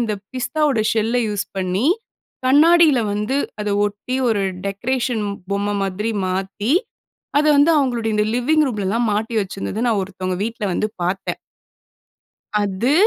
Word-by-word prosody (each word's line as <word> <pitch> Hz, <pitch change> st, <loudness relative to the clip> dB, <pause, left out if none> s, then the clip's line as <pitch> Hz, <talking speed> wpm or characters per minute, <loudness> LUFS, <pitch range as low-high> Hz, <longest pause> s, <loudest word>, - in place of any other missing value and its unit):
இந்த 225 Hz, -3 st, 0 dB, 0.2 s
பிஸ்தாவோட 280 Hz, -2 st, +1 dB
ஷெல்ல 225 Hz, +2 st, +1 dB
யூஸ் 205 Hz, -1 st, -2 dB
பண்ணி, 185 Hz, +6 st, 0 dB, 0.6 s
கண்ணாடியில 310 Hz, +1 st, +6 dB
வந்து 210 Hz, +6 st, -1 dB, 0.3 s
அத 210 Hz, -, -2 dB, 0.2 s
ஒட்டி 205 Hz, +5 st, -5 dB
ஒரு 210 Hz, -3 st, +1 dB, 0.2 s
டெக்கரேஷன் 235 Hz, +2 st, -1 dB, 0.3 s
பொம்ம 200 Hz, +1 st, 0 dB
மாதிரி 195 Hz, +3 st, -2 dB, 0.2 s
மாத்தி, 195 Hz, +5 st, -2 dB, 0.7 s
அத 300 Hz, -, +2 dB
வந்து 285 Hz, +4 st, +5 dB
அவுங்களுடைய 240 Hz, -5 st, 0 dB
இந்த 210 Hz, 0 st, +2 dB
லிவிங் 305 Hz, +6 st, +3 dB
ரூம்லலாம் 220 Hz, +1 st, 0 dB
மாட்டி 220 Hz, +3 st, -2 dB
வச்சிருந்தத 195 Hz, +3 st, -4 dB
நான் 220 Hz, -4 st, +2 dB
ஒருத்தவங்க 185 Hz, -1 st, -4 dB
வீட்ல 225 Hz, -1 st, -4 dB
வந்து 215 Hz, -, 0 dB, 0.2 s
பாத்தேன். 180 Hz, +2 st, -2 dB, 1.3 s
அது, 205 Hz, +8 st, 0 dB
220 Hz, 130 wpm, -20 LUFS, 200-255 Hz, 1.3 s, கண்ணாடியில